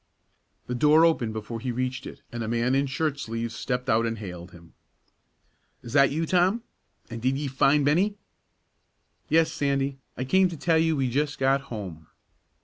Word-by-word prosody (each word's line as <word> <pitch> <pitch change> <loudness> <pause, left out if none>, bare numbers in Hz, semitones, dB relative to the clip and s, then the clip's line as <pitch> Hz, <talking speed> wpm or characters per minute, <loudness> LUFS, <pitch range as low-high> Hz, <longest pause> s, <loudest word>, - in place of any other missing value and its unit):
The 125 - -4
door 150 +6 +5
opened 125 -9 +1
before 110 +1 -5
he 125 +2 -3
reached 130 +2 -3
it, - - -11
and 120 - -5
a - - -4
man 120 +2 +1
in 140 +1 +2
shirt 145 +1 -1
sleeves 115 -1 -4
stepped 125 -1 -3
out 115 +1 +2
and 115 0 -3
hailed 90 -4 -8
him: 85 -2 -16 1.1
"Is 120 - -8
that 140 -1 +6
you, 160 +3 -1
Tom? 185 +7 +2 0.5
An' 115 - -5
did 130 +3 0
ye 145 - -3
find 140 +2 +3
Bennie?" 185 +8 +2 1.1
"Yes, 160 +1 +3
Sandy. 140 -1 -1 0.2
I 130 - -2
came 185 +8 +3
to 170 - -7
tell 160 +2 +2
you 160 0 +2
we 135 -2 0
just 145 +4 -1
got 135 +1 +2
home. 90 -8 -7
135 Hz, 180 wpm, -26 LUFS, 115-150 Hz, 1.1 s, that